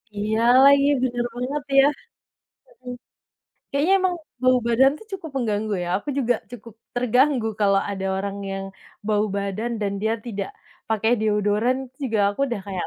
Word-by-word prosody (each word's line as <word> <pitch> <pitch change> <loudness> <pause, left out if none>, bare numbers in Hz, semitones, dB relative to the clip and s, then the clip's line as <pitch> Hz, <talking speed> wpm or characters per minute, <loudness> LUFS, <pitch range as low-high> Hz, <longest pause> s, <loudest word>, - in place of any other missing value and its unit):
Iya 215 +2 -1 0.2
lagi, 280 0 +6 0.2
benar 240 -1 -1
banget 275 +4 -3 0.2
ya. 270 - +7 0.8
Heeh. 255 - -10 0.8
Kayaknya 290 +7 +1
emang 365 -1 +1 0.3
bau 255 0 +5
badan 255 +3 +5
tuh 440 - -15
cukup 330 -5 -7
mengganggu 215 -3 -1
ya, - - -5
aku - - -13
juga 245 -2 +2 0.2
cukup 230 -2 -11 0.2
terganggu 250 0 +2
kalau 195 -1 +4
ada 195 -1 -3
orang 200 +1 -3 0.2
yang 195 0 -4 0.4
bau 210 -1 +2
badan 200 +4 -3
dan 200 -1 -1
dia 220 +1 +1
tidak 200 -4 -4 0.4
pakai 220 +1 +1
deodoran 210 +3 +1 0.3
juga 225 -5 -1
aku 240 - -8
udah 235 -5 -3
kayak 190 -3 -3
230 Hz, 155 wpm, -23 LUFS, 205-255 Hz, 0.8 s, ya